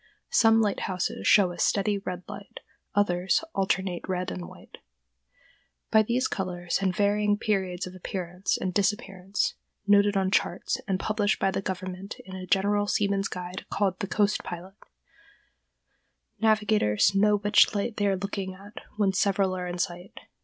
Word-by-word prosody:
Some 225 - +5
lighthouses 195 -3 -1
show 195 -4 +5
a 175 - -9
steady 205 0 +1
red 180 -2 -5
light; - - -9 0.3
others, 185 - +2
alternate 190 -2 0
red 185 -1 -2
and 90 -2 -6
white. - - -14 1.1
By 220 - +6
these 235 +4 0
colors 175 -2 -2
and 190 -2 0
varying 205 0 +2
periods 190 -4 -1
of 185 - -9
appearance 180 0 -3
and 185 -1 -2
disappearance 195 -1 -1 0.3
(noted 205 0 +4
on 190 -1 +1
charts, 180 -1 0
and 190 -2 0
published 215 0 0
by 195 - +2
the - - -2
government 185 0 -5
in 190 0 -9
a 185 -1 -7
general 205 +2 +2
seaman's 200 -1 +1
guide 180 0 -7
called 195 -2 0
the 200 - -3
"Coast 205 +1 +1
Pilot"), 180 +2 -7 1.7
navigators 210 - +3
know 210 +1 +4
which 205 +1 +4
light 210 +2 -2
they 205 - +1
are 195 -1 +1
looking 195 -1 -4
at 200 +2 -11 0.2
when 200 -2 +2
several 195 -1 +1
are 180 -1 -4
in 175 0 -4
sight. 175 +1 -4
195 Hz, 155 wpm, -27 LUFS, 185-205 Hz, 1.7 s, By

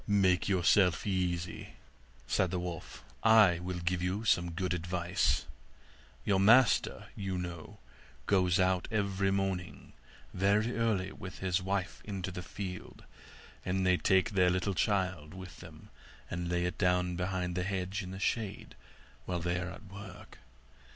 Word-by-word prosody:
'Make 95 -3 +3
yourself 90 -1 +3
easy,' 90 -3 -2 0.5
said 95 - +1
the 90 - -2
wolf, 90 -3 -6 0.2
'I 110 -6 +6
will 90 0 -4
give 85 +1 -1
you 95 +5 -2
some 85 -5 +3
good 90 +1 -2
advice. 90 -3 0 0.8
Your 100 -2 +3
master, 115 +6 +4
you 95 -2 -3
know, 85 -2 -6 0.5
goes 90 -2 +3
out 90 -1 +2
every 100 -3 0
morning 95 -2 -2 0.4
very 105 +5 +2
early 105 -5 0
with 95 0 -9
his 95 0 0
wife 95 -1 -2
into 95 -3 -4
the 90 - -5
field; 90 +1 -7 0.6
and 95 +1 0
they 90 0 +5
take 95 +3 +2
their 90 -3 +4
little 95 +2 0
child 90 -5 -1
with 95 -1 -10
them, 80 -3 -13 0.4
and 85 0 -3
lay 90 0 0
it 90 - -3
down 90 -1 +2
behind 90 0 -2
the 90 - -1
hedge 95 +2 -2
in 90 - -7
the 95 +1 -7
shade 105 0 -2 0.5
while 90 -1 -2
they 85 +1 -1
are 90 0 -4
at 105 - -10
work. 100 -2 -11
90 Hz, 150 wpm, -32 LUFS, 90-100 Hz, 0.8 s, I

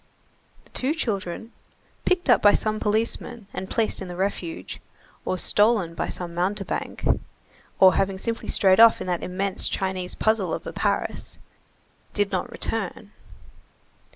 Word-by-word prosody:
The - - -25
two 275 +5 0
children, 220 - -3 0.5
picked 360 -2 +1
up 245 - +5
by 205 0 +6
some 215 0 0
policeman 225 +1 -1
and 190 - -5
placed 225 -3 0
in 190 - -5
the 175 - -7
refuge, 180 - -4 0.4
or 185 - -1
stolen 205 -3 +2
by - - -3
some 175 -2 -5
mountebank, 190 +2 -2 0.7
or 190 -1 +8
having 195 0 0
simply 230 +4 -3
strayed 190 0 +4
off 230 0 +8
in - - -4
that 180 -2 -1
immense 190 +2 0
Chinese 190 -1 -2
puzzle 215 -6 +1
of - - -8
a - - -6
Paris, - - -2 0.8
did 205 -1 +1
not 245 - -1
return. 210 -2 -4
200 Hz, 145 wpm, -25 LUFS, 185-225 Hz, 0.8 s, or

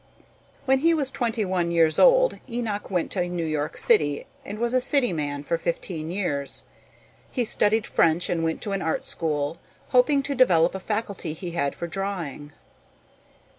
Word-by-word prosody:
When 265 0 +3
he 330 +3 +3
was 280 -4 -1
twenty 230 -3 -1
one 180 -2 0
years 165 -2 +3
old - - +5
Enoch 230 -4 -3
went 180 -3 -1
to 180 -2 -1
New 175 -2 -2
York 155 -1 -2
City 145 -1 +2 0.2
and 205 - -7
was 235 +2 0
a 255 - +3
city 250 -5 +2
man 145 -2 -3
for 165 +3 -1
fifteen 165 -1 -3
years. 155 -7 -2 0.7
He 245 -3 0
studied 215 0 +2
French 165 +1 +2
and 165 -2 -1
went 160 0 -1
to 205 - -3
an 195 -1 -1
art 160 -2 -1
school, 150 -1 -2 0.3
hoping 275 +2 +4
to 280 - -2
develop 180 -10 +4
a 190 - -4
faculty 200 -5 -3
he 175 +2 -6
had 155 -5 -1
for - - -5
drawing. 170 -5 -5
180 Hz, 170 wpm, -25 LUFS, 160-230 Hz, 0.7 s, old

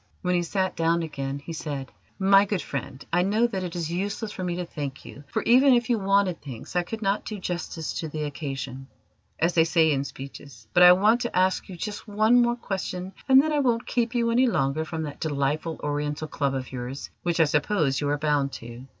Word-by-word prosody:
When 180 0 +1
he 175 - +2
sat 185 +2 -1
down 165 +1 +1
again, 140 -3 -4
he 145 +4 -8
said: 145 -4 -5 0.3
"My 195 +1 +5
good 200 -3 -2
friend, 140 -1 -6
I 175 - +4
know 210 +5 +2
that 195 -6 -2
it 180 -1 -5
is 165 -2 -3
useless 205 +4 -3
for 185 - -6
me 175 -1 -1
to 180 0 -3
thank 145 -5 -6
you, 145 - -11
for - - -2
even 255 +2 +6
if 240 +1 +1
you 230 - +2
wanted 195 -2 +2
thanks 135 +2 -9
I 180 - +4
could 220 +5 -6
not 195 +1 +1
do 215 - -5
justice 175 -3 -4
to 160 - -3
the 155 0 -4
occasion, 135 -3 -5 0.5
as 170 +2 +1
they 165 - +5
say 160 -1 +3
in 140 -1 +1
speeches: 135 -4 -10
but 175 - +5
I 180 0 +10
want 215 +6 +3
to 240 - -2
ask 185 +1 +1
you 180 - -8
just 205 +5 -5
one 215 +4 +4
more 240 0 +2
question, 190 -4 -4 0.2
and 265 0 +8
then 310 +2 +2
I 295 - +2
won't 240 -4 +1
keep 240 0 -1
you 235 -1 +2
any 250 +2 +4
longer 145 - 0
from 160 0 -4
that 145 -2 -7
delightful 150 +2 -1
Oriental 150 +1 -2
Club 140 -3 -1
of 130 -1 -5
yours 130 +2 -6
which 175 -1 -1
I - - +7
suppose 150 -1 +1
you 145 - 0
are 145 - +1
bound 145 -2 0
to. 120 +3 -9
170 Hz, 225 wpm, -26 LUFS, 145-205 Hz, 0.5 s, I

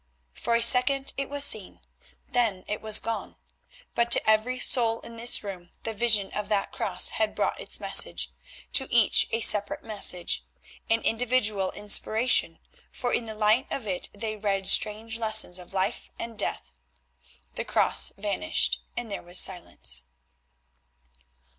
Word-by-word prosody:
For 235 - -2
a 235 - +2
second 265 +3 +3
it 275 0 -4
was 285 0 -1
seen. 210 -8 +1 0.5
Then 220 -7 -1
it 210 - -4
was 215 -1 +5
gone, 225 0 -5 0.6
but 235 0 0
to 235 - +2
every 220 +4 +2
soul 230 -3 +2
in 230 - -11
this 235 0 +1
room 185 -4 -8
the 225 - -4
vision 215 -3 +2
of 210 0 -5
that 205 -2 -1
cross 180 -2 +1
had 220 -1 -2
brought - - -2
its - - -1
message; - - +2 0.4
to 265 - 0
each 235 -3 +4
a 225 - -2
separate 205 -2 +1
message, 200 -5 +1 0.5
an 225 0 +2
individual 225 -5 0
inspiration, 220 +3 +1 0.3
for 245 - -4
in 235 - -1
the 220 -1 -8
light 215 +4 +1
of 260 - -5
it 185 -3 -4
they 215 +1 -6
read 200 -2 -2
strange 220 +3 +3
lessons 215 -5 +4
of 180 - -13
life 195 +3 -3
and 230 -2 -8
death. - - -4 0.8
The - - -5
cross - - +4
vanished 210 - -1 0.2
and 240 -3 -5
there 200 - -5
was 175 +1 -5
silence. 180 - -1
220 Hz, 155 wpm, -26 LUFS, 200-235 Hz, 0.8 s, was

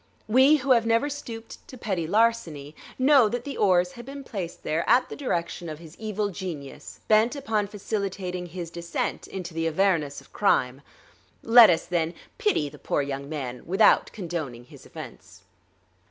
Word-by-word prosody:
We 260 +7 +6
who 275 -2 -1
have 230 -2 +4
never 230 +6 +2
stooped 230 -5 -8
to 255 - -11
petty 185 -8 -2
larceny 170 -9 0 0.2
know 265 -4 +5
that 240 +2 -3
the 280 -1 -6
oars 180 -3 +3
had 240 - -10
been 275 +2 -8
placed 190 -9 -6
there 160 +2 0
at 250 +1 +4
the - - -6
direction 175 - -3
of 155 - -6
his 165 0 -13
evil 210 -2 -2
genius 170 -8 -8
bent 220 +4 +4
upon 220 -7 -1
facilitating 195 -3 -4
his 170 -1 -7
descent 170 0 -3
into 180 -3 -7
the 165 0 -1
avernus 165 -4 +1
of - - -20
crime. 130 -9 +1 0.6
Let 230 0 +8
us, 165 -2 +2
then, 170 -1 -1 0.2
pity 410 - +1
the 140 - -12
poor 145 - -1
young 140 0 -5
man 130 -5 -5
without 195 +5 +4
condoning 160 - -5
his - - -15
offense. - - -11
190 Hz, 170 wpm, -26 LUFS, 165-230 Hz, 0.6 s, Let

